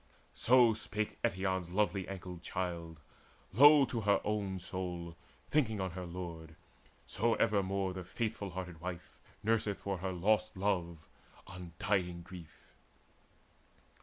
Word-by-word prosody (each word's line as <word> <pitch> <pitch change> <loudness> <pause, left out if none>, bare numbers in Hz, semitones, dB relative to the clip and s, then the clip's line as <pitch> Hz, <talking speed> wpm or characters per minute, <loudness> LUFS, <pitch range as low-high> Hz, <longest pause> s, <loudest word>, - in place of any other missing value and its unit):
So 120 -2 +5
spake 110 0 -4
Eetion's 95 -1 0
lovely 95 -1 0
ankled 90 -3 -7
child 85 -4 -4 0.5
Low 145 +5 +8
to 120 -2 -3
her 100 -1 +3
own 100 -3 -1
soul, 90 -2 -5 0.4
thinking 115 -9 +2
on 95 -1 -2
her 90 0 -6
lord. 85 -2 -7 0.5
So 115 +3 +1
evermore 100 -2 +1
the 95 0 -5
faithful 105 +1 -3
hearted 90 -2 -6
wife 90 -1 -7 0.2
Nurseth 110 -2 +1
for 100 -2 -2
her 95 +1 -2
lost 105 +3 +1
love 85 -5 -1 0.4
undying 90 0 -2
grief. 85 -2 -13
95 Hz, 120 wpm, -34 LUFS, 90-105 Hz, 0.5 s, Low